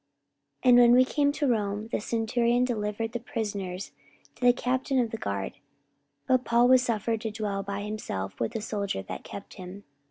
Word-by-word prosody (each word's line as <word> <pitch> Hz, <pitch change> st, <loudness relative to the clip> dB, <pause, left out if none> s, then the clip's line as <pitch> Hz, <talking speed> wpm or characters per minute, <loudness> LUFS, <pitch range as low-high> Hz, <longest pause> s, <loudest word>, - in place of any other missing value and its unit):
44:028:016 255 Hz, -, +4 dB
And 245 Hz, -, +8 dB
when 240 Hz, -1 st, +7 dB
we 255 Hz, +1 st, +6 dB
came 285 Hz, +1 st, +1 dB
to 290 Hz, 0 st, -1 dB
Rome, 210 Hz, -2 st, 0 dB
the -, -, 0 dB
centurion 235 Hz, +2 st, +1 dB
delivered 225 Hz, -1 st, -2 dB
the 240 Hz, -, -3 dB
prisoners 200 Hz, -5 st, -4 dB, 0.4 s
to -, -, -12 dB
the 245 Hz, -, +8 dB
captain 260 Hz, +2 st, -1 dB
of 235 Hz, -3 st, +1 dB
the 225 Hz, -, -3 dB
guard: 100 Hz, -, -4 dB, 0.7 s
but 255 Hz, -1 st, +3 dB
Paul 235 Hz, 0 st, +4 dB
was 255 Hz, 0 st, +6 dB
suffered 225 Hz, -2 st, -1 dB
to 220 Hz, -, -2 dB
dwell 210 Hz, -2 st, -3 dB
by 200 Hz, 0 st, -4 dB
himself 205 Hz, -, -5 dB
with 115 Hz, -, -2 dB
a 225 Hz, -, -2 dB
soldier 200 Hz, -, -3 dB
that -, -, -7 dB
kept 200 Hz, -, -9 dB
him. 185 Hz, +2 st, -9 dB
225 Hz, 190 wpm, -27 LUFS, 200-245 Hz, 0.7 s, And